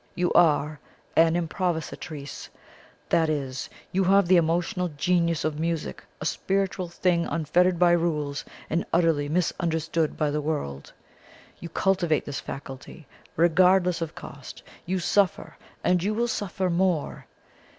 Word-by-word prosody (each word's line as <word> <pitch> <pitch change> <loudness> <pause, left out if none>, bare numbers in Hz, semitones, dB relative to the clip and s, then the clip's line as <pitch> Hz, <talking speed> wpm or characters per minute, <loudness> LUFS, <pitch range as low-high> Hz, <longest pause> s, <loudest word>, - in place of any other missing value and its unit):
You 175 0 0
are 150 -2 +3 0.4
an 165 0 +5
improvisatrice 160 -4 -3 0.6
that 160 -1 +3
is, 135 -4 -3 0.2
you 190 +1 +2
have 195 0 +4
the 185 - +5
emotional 175 +3 +1
genius 170 +1 0
of 155 -1 -2
music, 165 -1 -3 0.2
a - - -5
spiritual 195 -2 -1
thing 175 0 +1
unfettered 175 +3 +2
by 175 0 +5
rules, 150 -4 0 0.2
and 165 - 0
utterly 160 -4 +2
misunderstood 165 -1 0
by 150 -2 +1
the 150 +1 -1
world. 105 - -4 0.7
You 170 - -7
cultivate 175 -3 +1
this 140 -1 -4
faculty, 135 +3 -9 0.3
regardless 180 +1 +4
of 165 -2 -4
cost; - - -10 0.2
you 190 +2 0
suffer, 190 +1 +1 0.3
and 180 -1 +3
you 210 +4 0
will 235 +2 +1
suffer 190 -4 -2
more. 175 -3 0
170 Hz, 130 wpm, -26 LUFS, 155-180 Hz, 0.7 s, an